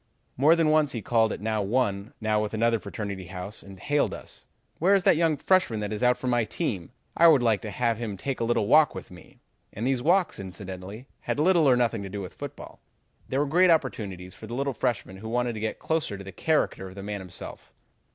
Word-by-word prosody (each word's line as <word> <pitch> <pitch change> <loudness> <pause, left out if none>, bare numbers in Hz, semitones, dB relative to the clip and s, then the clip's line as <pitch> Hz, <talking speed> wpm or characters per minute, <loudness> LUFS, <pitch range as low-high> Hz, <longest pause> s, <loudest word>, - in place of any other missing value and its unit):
More 150 +6 +5
than 165 -2 +2
once 155 -2 +3
he 115 -4 -4
called 115 -2 +2
at - - -5
now 110 0 0
one, 100 -1 -1
now 110 -1 +1
another 115 +2 +1
fraternity 100 -2 -6
house 95 +3 -7
and 95 -1 -13
hailed 145 +7 0
us: - - -11 0.3
'Where 190 +5 +4
is 195 - +2
that 195 - +5
young 160 -2 +2
freshman 180 - +2
that 105 0 -3
is 105 - -4
out 125 0 +4
for - - -8
my 120 -2 +2
team? 105 - -3 0.2
I 170 - +6
would 145 -6 +6
like 110 -4 +2
to 110 - -6
have 115 0 0
him 110 -4 -4
take 135 +6 -3
a - - 0
little 115 -2 +1
walk 155 +6 +5
with - - -8
me.' 90 - -15 0.3
And 110 - -4
these 130 -1 +1
walks, 180 +5 +2
incidentally, 95 +3 -8
had - - -3
little 165 -2 +4
or 125 - +6
nothing 115 -3 +1
to 100 - -6
do 100 +2 -5
with 95 -3 -7
football. - - -9 0.5
They 130 - -1
were 145 - +2
great 175 +6 +4
opportunities 95 - -1
for 110 - -11
the 120 - -5
little 140 +1 -1
freshman 105 -6 -2
who 110 +3 -7
wanted 120 0 0
to 110 - -6
get 110 0 -3
closer 160 -11 -2
to 100 - -9
the 95 - -8
character 150 - 0
of 95 - -12
the 100 - -7
man 100 -1 -4
himself. 90 -2 -9
115 Hz, 230 wpm, -26 LUFS, 100-145 Hz, 0.5 s, I